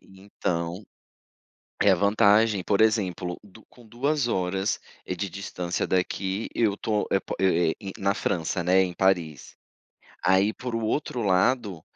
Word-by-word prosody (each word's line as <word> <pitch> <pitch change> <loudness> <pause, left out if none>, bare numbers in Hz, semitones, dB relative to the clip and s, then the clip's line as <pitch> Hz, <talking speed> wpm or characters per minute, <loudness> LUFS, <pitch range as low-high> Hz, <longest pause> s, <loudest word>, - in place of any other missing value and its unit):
E, 95 0 -18
então, 85 -1 -3 1.0
é 100 - +5
a 95 - +5
vantagem, 100 +1 +3
por 100 +1 +1
exemplo, 95 -5 0
do 105 +2 -17
com 120 -2 -18
2 135 +4 0
horas, 95 -2 -1 0.3
eh, 90 - -3
de 100 +1 -3
distância 90 -1 -4
daqui 95 +3 -1
eu 110 -4 +2
estou 105 +1 -1
é 95 - +2
pa - - -6
é 85 -3 +3
i 95 - -6
é - - -13
na 100 +1 +2
França, 90 -2 -1
né, 90 +2 +4
em 90 - -3
Paris. 85 -5 0 0.7
Aí 95 +3 +3
por 125 +1 -6
o - - -2
outro 125 +1 -2
lado, 95 -1 +1
95 Hz, 160 wpm, -26 LUFS, 90-110 Hz, 1.0 s, é